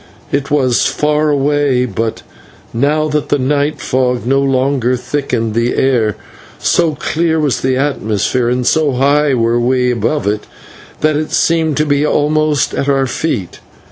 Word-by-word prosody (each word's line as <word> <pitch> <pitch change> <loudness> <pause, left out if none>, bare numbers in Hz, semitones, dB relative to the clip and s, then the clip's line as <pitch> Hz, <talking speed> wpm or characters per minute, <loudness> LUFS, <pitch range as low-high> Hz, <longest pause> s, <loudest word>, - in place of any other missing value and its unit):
It 140 0 -1
was 130 -5 +2
far 150 0 0
away, 145 -3 +1
but, 115 0 -3 0.5
now 150 +6 +1
that 150 0 -2
the - - +2
night 145 +3 0
fog 125 -2 -1
no 135 +2 +2
longer 130 -2 +1
thickened 125 -3 -2
the 115 +2 0
air, 120 -6 +1 0.4
so 165 -3 +1
clear 160 +1 -1
was 145 -4 0
the 130 0 0
atmosphere 125 -3 0
and 125 0 -1
so 155 -1 +2
high 140 +2 +2
were 115 0 +1
we 125 +1 +1
above 125 +6 -1
it, 105 +1 -2 0.5
that 155 0 +2
it 155 0 -3
seemed 160 -3 +1
to 150 - +2
be 145 -1 +1
almost 150 0 +1
at 140 - -1
our 135 -1 +2
feet. 120 - -3
135 Hz, 155 wpm, -14 LUFS, 125-150 Hz, 0.5 s, was